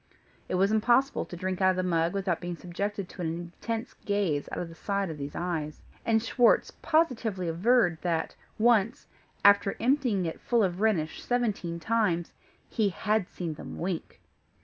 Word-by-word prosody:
It - - 0
was 195 +3 +3
impossible 240 +5 +2
to - - -9
drink 185 +2 -3
out 185 - +5
of 185 - +2
the 185 - 0
mug 170 -1 +1
without 195 -4 -1
being 175 -1 -4
subjected 200 +3 -4
to 180 - -9
an 170 - -1
intense 220 +7 -5
gaze 200 -8 0
out - - -4
of 175 - -3
the 165 - -11
side 200 +1 -2
of 150 - -8
these 140 0 -6
eyes; 160 -4 -3 0.2
and 225 -1 +2
Schwartz 235 +1 +3
positively 230 - +1
averred, 175 +1 +3
that 170 -2 -1 0.2
once, 230 +2 +3 0.4
after 200 0 +6
emptying 245 -7 +2
it, 165 - -5
full 235 -2 +2
of 185 0 -1
Rhenish, 190 -8 +1
seventeen 210 -9 -1
times, 175 -3 0 0.3
he 215 -3 +1
had 210 +2 0
seen 170 -3 -4
them 150 - -8
wink! 175 -1 -4
195 Hz, 170 wpm, -28 LUFS, 175-225 Hz, 0.4 s, after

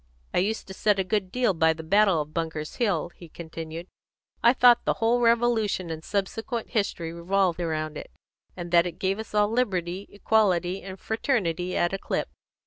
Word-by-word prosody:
"I - - +3
used 210 +5 -1
to 190 - -9
set 205 +1 +2
a 190 - +1
good 190 -1 -1
deal 245 -3 +2
by 160 -1 +3
the 160 0 -9
battle 195 0 +4
of 150 +1 -20
Bunker's 160 -2 -4
Hill," 185 -7 0
he 170 - -13
continued. 165 0 -7 0.6
"I 235 - +6
thought 245 -1 +5
the - - +1
whole 230 +2 +2
Revolution 230 -6 +2
and 160 0 -6
subsequent 220 +5 -3
history 185 -7 -1
revolved 180 +1 0
round 155 -2 -2
it, - - -10 0.5
and 175 -1 -6
that 170 0 +5
it 170 -1 -7
gave 195 +2 -1
us 220 -1 -7
all 210 0 +3
liberty, 190 -6 -1
equality, 195 -4 +1
and 190 0 -9
fraternity 185 - -1
at 175 +2 +1
a 195 - -2
clip. - - -2
190 Hz, 185 wpm, -26 LUFS, 170-215 Hz, 0.6 s, I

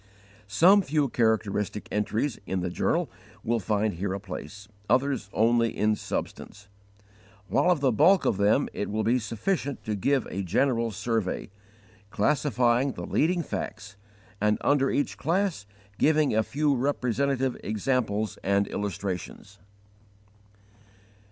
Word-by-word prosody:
Some 175 - +5
few 150 -5 0
characteristic 105 -3 0
entries 110 +4 -1
in 95 -1 -1
the 90 0 -3
journal - - 0 0.4
will 115 +1 0
find 105 +1 0
here 95 +3 -3
a - - -4
place; 100 +1 -8 0.2
others, 130 -5 +1
only 115 +1 +2
in 105 0 +2
substance; 100 -1 -6 0.8
while 180 - +2
of 175 -5 +2
the 135 -2 +3
bulk 170 - +4
of - - +1
them 105 +7 +3
it - - -3
will 110 +1 -1
be 120 +3 +2
sufficient 135 - -3
to 110 - -3
give 130 +7 +1
a 100 - -3
general 115 +5 +1
survey, 110 -2 -2 0.6
classifying 125 +1 +1
the - - -6
leading 170 +3 +1
facts, 110 -7 -6 0.5
and 105 0 +2
under 140 -2 +2
each 145 - -1
class 170 - -1 0.3
giving 155 -5 +3
a 110 - +4
few 145 +5 0
representative 135 0 0
examples 110 -1 -1
and 100 +1 +2
illustrations. 100 0 -5
115 Hz, 130 wpm, -27 LUFS, 105-140 Hz, 0.8 s, Some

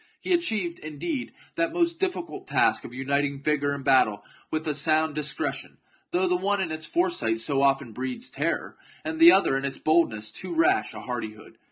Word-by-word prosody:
He 370 - -1
achieved, 215 - 0
indeed, 155 - -4 0.2
that 165 0 0
most 340 -1 0
difficult 375 0 -3
task 385 -1 +2
of - - -9
uniting 140 +2 -1
vigour 145 -1 +1
in 140 - -8
battle 130 -6 +3 0.3
with 155 0 -3
a 150 - +1
sound 155 +1 +2
discretion, 150 0 -2 0.3
though 185 +1 +1
the 180 - +2
one 200 +3 0
in 180 -4 -1
its 155 0 -2
foresight 345 - +1
so 135 +4 0
often 135 -4 +1
breeds 130 - -4
terror, - - -3 0.3
and 320 0 -4
the 335 +1 +10
other 195 - +4
in 135 - -1
its 135 -1 -2
boldness 115 -10 +1
too 340 - -6
rash 365 +4 +2
a - - -7
hardihood. 110 -3 -7
155 Hz, 185 wpm, -26 LUFS, -, 0.3 s, the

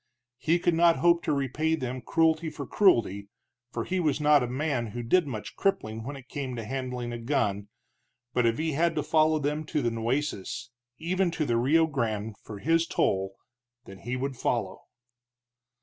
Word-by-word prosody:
He 165 +2 +2
could 175 0 +1
not 170 0 +5
hope 170 0 +3
to - - +1
repay 145 +3 0
them 130 -3 -4
cruelty 160 +3 +2
for 150 -2 -7
cruelty, 115 - +2 0.4
for 115 - -3
he 185 +6 -1
was 150 -4 +1
not 150 -1 +5
a 125 - -1
man 130 -2 -1
who 120 +3 -5
did 170 +7 +3
much 110 -6 -6
crippling 110 - -1
when 140 +4 -6
it 135 -2 -12
came 135 -3 -4
to 115 - -5
handling 125 -1 -4
a 120 - -5
gun, 110 -6 -1 0.7
but 125 -1 +3
if 115 - +1
he 160 +1 -1
had 165 +3 +1
to 150 - 0
follow 155 0 +3
them 150 +1 -1
to 150 -2 -1
the 120 - +1
Nueces, 120 -1 -2 0.3
even 180 +3 0
to 165 -2 -2
the 120 - +1
Rio 145 +8 +4
Grande, 110 -8 -2
for 105 - -9
his 165 +8 +2
toll, 95 0 0 0.5
then 95 0 -11
he 120 +4 -4
would 135 +1 -3
follow. 115 -5 -2
135 Hz, 185 wpm, -28 LUFS, 115-160 Hz, 0.7 s, not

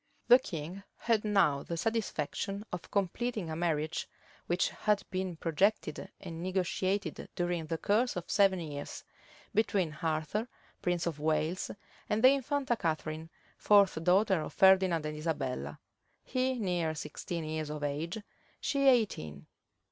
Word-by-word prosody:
The 245 - +10
king 175 - -6 0.2
had 225 -3 +1
now 195 -10 +3
the 170 - -4
satisfaction 200 -1 -2
of 180 - -5
completing 200 -1 -1
a - - -3
marriage, 160 -1 -1 0.4
which 175 +1 +2
had 210 -2 0
been 185 -2 -2
projected 175 +7 0
and 165 -3 -7
negotiated 185 0 -1
during 175 -2 -1
the 165 - -1
course 220 +8 +1
of 175 -1 -4
seven 195 -2 +4
years, 145 -3 -6 0.5
between 185 -7 +1
Arthur, 160 +7 -1 0.3
prince 175 -2 0
of 165 -4 -2
Wales, 155 +3 0 0.4
and 210 +1 +1
the 255 - +10
infanta 275 -2 0
Catharine, 160 -3 -2 0.3
fourth 200 -5 +5
daughter 190 0 +4
of - - -6
Ferdinand 190 -4 +5
and 150 0 -3
Isabella; 130 - -3 0.5
he 255 0 0
near 175 -7 0
sixteen 165 +2 -5
years 155 -1 -3
of 150 -1 -5
age, 150 +6 -2 0.4
she 275 -1 +1
eighteen. 185 - +2
175 Hz, 135 wpm, -31 LUFS, 155-205 Hz, 0.5 s, The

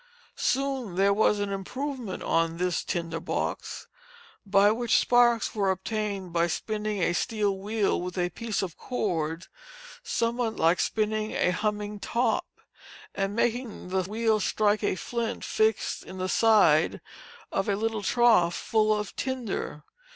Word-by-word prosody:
Soon 265 -7 -1
there 200 +2 +4
was 210 0 +3
an 205 -1 -2
improvement 245 +3 -4
on 165 0 +1
this 180 0 0
tinder 165 -2 -3
box, 170 - -3 0.6
by 200 +1 +5
which 235 +1 +2
sparks 240 -2 +3
were 200 -3 +1
obtained 195 -1 -3
by 170 0 +2
spinning 210 +2 -2
a 170 - +2
steel 205 +1 0
wheel 205 -1 0
with 180 +1 -5
a 180 0 0
piece 220 +2 -2
of 180 -4 -5
cord, 170 -8 -2 0.6
somewhat 235 - -1
like 165 +2 +3
spinning 215 0 0
a 180 - +2
humming 210 +1 -2
top, 240 +4 0 0.7
and 195 0 -2
making 235 -4 -1
the 190 0 +1
wheel 215 +3 +1
strike 210 +1 +1
a 205 - +1
flint 235 +4 -3
fixed 220 -1 +1
in 190 - -10
the 185 0 -2
side 205 -10 +4 0.5
of 195 +1 -1
a 200 - +2
little 220 +1 -1
trough 205 -6 +4
full 215 -1 +1
of 210 - -6
tinder. 240 - -3
210 Hz, 145 wpm, -27 LUFS, 185-225 Hz, 0.7 s, by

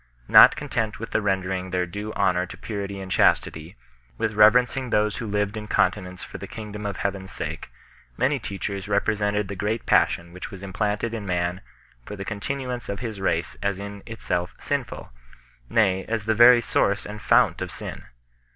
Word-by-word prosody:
Not - - +9
content 110 -2 -2
with 115 0 -7
rendering 95 -2 0
their 90 0 0
due 105 +5 -6
honour 90 -2 +1
to - - -10
purity 100 -2 -5
and 95 -1 -7
chastity, 80 -3 +1 0.4
with 110 -1 -1
reverencing 125 +4 +4
those 105 -1 +1
who 115 - -4
lived 105 0 -1
in 105 -1 -6
continence 90 -3 0
for - - -8
the - - -7
King 105 -1 -8
dom 105 0 -5
of 100 - -4
Heaven 100 -1 -2
s - - -11
sake, - - -5 0.5
many 140 +1 +1
teachers 100 -1 -5
represented 105 0 +1
the 100 - -5
great 105 +3 -2
passion 85 0 +2
which 90 - -7
was 95 -3 -10
implanted 105 +3 -2
in 105 -3 -5
man 90 0 -1 0.4
for 105 - -7
the 100 -1 -6
con 105 0 -4
tinuance 125 0 -4
of 100 -1 -3
his 110 -5 -5
race 85 -2 -1
as 100 -1 -1
in 100 0 -7
itself 90 -6 -3
sinful; - - -4 0.6
nay, 95 -4 +2
as 110 -2 -2
the 110 - +2
very 120 +2 +8
source 100 -2 +1
and 105 +1 -7
fount - - +3
of - - -4
sin. - - -7
100 Hz, 185 wpm, -24 LUFS, 95-110 Hz, 0.6 s, Not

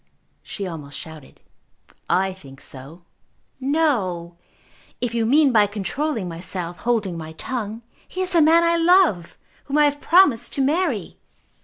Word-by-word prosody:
she 200 - -6
almost 150 -6 -7
shouted. 160 -3 -11 0.7
"I 190 0 +1
think 135 -8 -14
so." 140 +7 -10 0.6
"No; 235 - 0 0.6
if 245 -2 -2
you 230 -1 0
mean 285 +2 +4
by 210 -3 +4
controlling 220 +3 -3
myself, 175 0 -5
holding 215 -8 -1
my 160 0 -8
tongue. 225 +4 -5 0.2
He 370 - -5
is 370 0 -1
the 340 -3 +4
man 325 +2 +5
I 335 0 +3
love, 335 - +3 0.3
whom 285 +1 -1
I 300 - +6
have 290 0 0
promised 330 -10 +4
to 275 - -1
marry." 285 - -1
225 Hz, 145 wpm, -22 LUFS, -, 0.7 s, I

